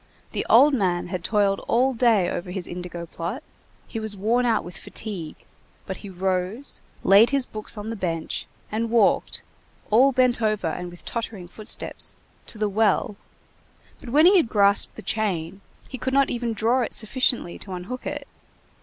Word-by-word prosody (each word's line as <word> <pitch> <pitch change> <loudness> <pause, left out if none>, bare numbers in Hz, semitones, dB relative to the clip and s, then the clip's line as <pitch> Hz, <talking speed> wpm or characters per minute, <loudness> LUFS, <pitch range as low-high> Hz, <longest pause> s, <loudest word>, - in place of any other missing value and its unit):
The - - -2
old 290 +1 +7
man 180 -7 0
had 180 -2 -4
toiled 200 -1 +2
all 260 +3 +3
day 225 -6 +3
over 180 0 -4
his 180 -1 -3
indigo 175 -1 -6
plot, 175 - -5 0.4
he 225 - -5
was 220 -2 -3
worn 235 +5 +1
out 230 - +2
with 175 -1 -9
fatigue, 175 -4 -5 0.5
but 190 - -5
he 200 - -10
rose, 190 +6 -2 0.2
laid 200 +4 +7
his 275 -2 +1
books 215 -1 -3
on 210 +2 -5
the - - -4
bench, 165 -5 -3 0.2
and 225 +2 -1
walked, 225 -3 +2 0.5
all 255 +6 +6
bent 250 -2 +3
over 215 -3 0
and 175 +2 -3
with 175 0 -11
tottering 220 -6 -5
footsteps, 215 +5 -2 0.3
to - - -5
the 215 0 0
well, 210 0 +1 0.8
but - - -10
when 300 +6 +5
he 385 +2 +7
had 290 -10 +2
grasped 200 -2 +4
the 220 - -9
chain, 195 -4 -2 0.3
he 260 - -7
could 260 +3 -1
not 275 -1 +3
even 235 -1 -2
draw 230 +4 +2
it 235 - -1
sufficiently 240 -4 +2
to 190 - -8
unhook 185 +8 -6
it. 290 -1 -5
215 Hz, 175 wpm, -24 LUFS, 185-240 Hz, 0.8 s, old